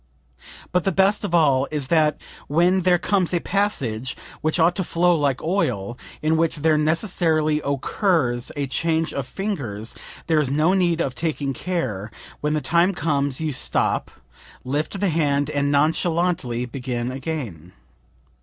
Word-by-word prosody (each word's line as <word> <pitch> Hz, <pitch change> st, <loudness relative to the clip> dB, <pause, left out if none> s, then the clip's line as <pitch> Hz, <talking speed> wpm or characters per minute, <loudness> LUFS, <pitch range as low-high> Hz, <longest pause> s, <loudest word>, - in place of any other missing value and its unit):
But 180 Hz, -1 st, +2 dB
the 195 Hz, -, +1 dB
best 195 Hz, +4 st, +2 dB
of 185 Hz, -4 st, 0 dB
all 140 Hz, -5 st, +4 dB
is 145 Hz, -4 st, -3 dB
that 155 Hz, -3 st, +3 dB, 0.3 s
when 175 Hz, +5 st, +3 dB
there 180 Hz, 0 st, +4 dB
comes 185 Hz, -1 st, +1 dB
a -, -, +2 dB
passage 135 Hz, -, -1 dB, 0.2 s
(which 155 Hz, +2 st, 0 dB
ought 170 Hz, +2 st, +4 dB
to 190 Hz, -, 0 dB
flow 175 Hz, +1 st, +2 dB
like 140 Hz, -4 st, 0 dB
oil) 125 Hz, -, -1 dB, 0.3 s
in 160 Hz, +1 st, +2 dB
which 165 Hz, 0 st, +1 dB
there 155 Hz, +1 st, +2 dB
necessarily 155 Hz, -1 st, +1 dB
occurs 140 Hz, -, 0 dB
a 145 Hz, -1 st, -1 dB
change 160 Hz, +4 st, 0 dB
of 135 Hz, -3 st, -3 dB
fingers, 130 Hz, -, -4 dB, 0.3 s
there 160 Hz, -2 st, +2 dB
is 145 Hz, -4 st, +1 dB
no 155 Hz, +6 st, +2 dB
need 175 Hz, -3 st, +2 dB
of 135 Hz, -, -1 dB
taking 145 Hz, -2 st, -2 dB
care; 125 Hz, -, -3 dB, 0.3 s
when 150 Hz, +1 st, 0 dB
the 155 Hz, -, 0 dB
time 170 Hz, +4 st, +2 dB
comes 145 Hz, -4 st, 0 dB
you 155 Hz, -2 st, -1 dB
stop, 130 Hz, -, 0 dB, 0.5 s
lift 150 Hz, +9 st, -2 dB
the 200 Hz, -, +1 dB
hand 145 Hz, -3 st, +1 dB
and 145 Hz, -1 st, 0 dB
nonchalantly 155 Hz, -4 st, +1 dB
begin 125 Hz, -1 st, -4 dB
again. 130 Hz, -, -5 dB
155 Hz, 155 wpm, -23 LUFS, 135-175 Hz, 0.5 s, all